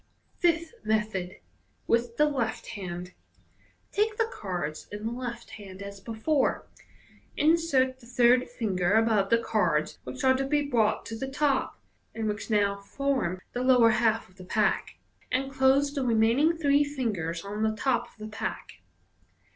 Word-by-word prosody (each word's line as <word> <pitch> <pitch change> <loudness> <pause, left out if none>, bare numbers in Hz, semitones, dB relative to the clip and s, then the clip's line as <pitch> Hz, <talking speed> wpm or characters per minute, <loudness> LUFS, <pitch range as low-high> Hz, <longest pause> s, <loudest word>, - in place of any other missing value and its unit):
Fifth 335 -2 +1
Method. 210 -4 -1 0.5
(With 235 0 0
the 300 - +5
left 245 -6 -2
hand.)— 180 -3 -6 0.8
Take 425 +1 0
the 450 - +2
cards 175 -6 -4
in 205 +1 -6
the 225 - -1
left 240 -1 -6
hand 200 -2 -9
as 200 0 -8
before. 230 +7 0 0.7
In 315 +3 +5
sert 260 -6 +1
the 235 - -16
third 245 +1 +4
finger 200 -6 0
above 220 -3 +3
the 230 - +5
cards 210 -9 0
which 125 0 -7
are 260 - +6
to 265 +1 0
be 290 +2 +1
brought 230 -7 +1
to 225 - -6
the 265 +4 -4
top 275 0 0 0.4
(and 225 -1 -2
which 210 +2 -3
now 200 -2 +2
form 200 -4 -2
the 245 - -2
lower 250 -3 +5
half 225 0 +1
of 185 - -24
the 185 - -10
pack), 180 - 0 0.3
and 270 +2 0
close 275 +2 +3
the 280 -2 -1
remaining 240 +8 +3
three 290 -2 +3
fingers 205 - -3
on 205 +2 -4
the 220 0 +1
top 240 +1 0
of - - -23
the 215 0 -7
pack. 90 - -5
230 Hz, 165 wpm, -28 LUFS, 205-270 Hz, 0.8 s, are